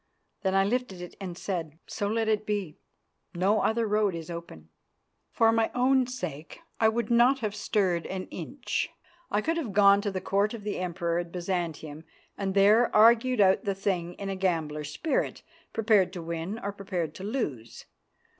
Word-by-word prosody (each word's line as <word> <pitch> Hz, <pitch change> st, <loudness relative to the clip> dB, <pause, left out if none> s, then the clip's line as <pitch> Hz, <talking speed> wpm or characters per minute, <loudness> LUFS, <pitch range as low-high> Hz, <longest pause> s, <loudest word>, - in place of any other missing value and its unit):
Then 190 Hz, -1 st, 0 dB
I 195 Hz, -, +5 dB
lifted 215 Hz, -3 st, -1 dB
it 180 Hz, 0 st, -8 dB
and 180 Hz, -3 st, -6 dB
said, 165 Hz, -6 st, -4 dB
"So 225 Hz, -2 st, -3 dB
let 225 Hz, +1 st, 0 dB
it 215 Hz, -1 st, +1 dB
be. 205 Hz, -7 st, -3 dB, 0.6 s
No 195 Hz, +5 st, +2 dB
other 230 Hz, +1 st, +1 dB
road 210 Hz, -3 st, +1 dB
is 165 Hz, 0 st, -7 dB
open." 170 Hz, -, -9 dB, 0.6 s
For 225 Hz, 0 st, +3 dB
my 225 Hz, -1 st, +2 dB
own 255 Hz, 0 st, +3 dB
sake 170 Hz, -, -6 dB, 0.2 s
I 220 Hz, -, +5 dB
would 235 Hz, 0 st, -2 dB
not 245 Hz, +3 st, +4 dB
have 215 Hz, -2 st, -2 dB
stirred 195 Hz, -5 st, 0 dB
an 185 Hz, -1 st, -4 dB
inch. 245 Hz, -, -3 dB, 0.4 s
I 205 Hz, -, +1 dB
would 330 Hz, +7 st, -1 dB
have 255 Hz, -12 st, -3 dB
gone 200 Hz, 0 st, +6 dB
to 205 Hz, -, -1 dB
the 190 Hz, -1 st, -3 dB
Court 200 Hz, +4 st, 0 dB
of 215 Hz, -, -9 dB
the 210 Hz, -2 st, -3 dB
Emperor 175 Hz, -1 st, -1 dB
at 175 Hz, -1 st, -5 dB
Byzantium 170 Hz, -4 st, -4 dB, 0.3 s
and 195 Hz, -1 st, -3 dB
there 210 Hz, +4 st, +5 dB
argued 235 Hz, +2 st, +5 dB
out 190 Hz, -1 st, +4 dB
the 200 Hz, -1 st, -1 dB
thing 180 Hz, -3 st, -2 dB
in 200 Hz, -, -6 dB
a 195 Hz, -, -2 dB
gambler's 160 Hz, -6 st, -1 dB
spirit, 275 Hz, -, -2 dB, 0.3 s
prepared 210 Hz, -5 st, +3 dB
to 175 Hz, -3 st, -6 dB
win 170 Hz, +5 st, -4 dB
or 200 Hz, -3 st, -4 dB
prepared 185 Hz, -6 st, -3 dB
to 185 Hz, -, -9 dB
lose. 150 Hz, -, -4 dB
195 Hz, 180 wpm, -28 LUFS, 175-220 Hz, 0.6 s, gone